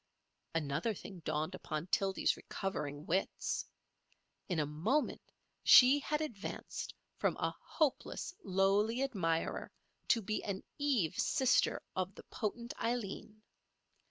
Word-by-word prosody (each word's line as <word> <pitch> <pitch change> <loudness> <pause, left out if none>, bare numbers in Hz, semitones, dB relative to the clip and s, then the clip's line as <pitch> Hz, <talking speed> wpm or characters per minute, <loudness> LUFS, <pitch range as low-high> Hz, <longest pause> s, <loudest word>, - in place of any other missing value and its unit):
Another 155 +7 0
thing 190 0 -9
dawned 155 +2 -2
upon 155 -4 -4
Tildy's 195 +1 +2
recovering 150 -6 -4
wits. 190 +4 0 0.8
In 180 - 0
a 150 - +2
moment 180 - 0 0.4
she 265 +3 +9
had 300 +1 -1
advanced 230 -11 -5 0.2
from - - +1
a - - -1
hopeless, 310 +3 -1
lowly 200 +6 +2
admirer 170 -11 -1 0.4
to 230 -3 +3
be 215 +2 -2
an 195 -2 -3 0.2
Eve 260 - +1
sister 260 -4 +3
of 185 +1 -2
the - - -11
potent 235 +3 -4
Aileen. 215 -2 -3
195 Hz, 115 wpm, -35 LUFS, 165-240 Hz, 0.8 s, she